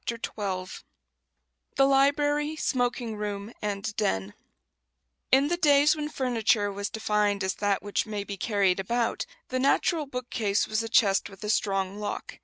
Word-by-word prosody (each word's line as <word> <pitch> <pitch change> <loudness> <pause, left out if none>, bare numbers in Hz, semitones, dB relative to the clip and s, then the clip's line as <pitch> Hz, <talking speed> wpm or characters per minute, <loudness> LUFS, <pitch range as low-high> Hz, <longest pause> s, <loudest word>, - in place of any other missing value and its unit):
] - - -4
XII 235 - -2 1.6
THE 270 - +5
LIBRARY, 290 +2 +2
SMOKING 245 -5 -1
ROOM, 205 +1 -5
AND 205 0 -3
"DEN" 100 - -1 1.0
In 270 +2 +5
the 345 +3 0
days 295 -3 +5
when 300 -1 -4
furniture 225 -6 +1
was 200 +1 -4
defined 210 -2 0
as 190 - 0
"that 205 -1 0
which 205 +2 -1
may 210 -2 -3
be 200 0 -6
carried 195 -2 +1
about," 235 +4 -1 0.2
the 255 - -1
natural 295 +3 +2
bookcase 240 -6 -1
was 215 +1 0
a 225 - -5
chest 200 -4 +3
with 195 +1 -13
a 210 - 0
strong 195 -1 0
lock. 205 -1 -5
215 Hz, 155 wpm, -27 LUFS, 200-270 Hz, 1.6 s, THE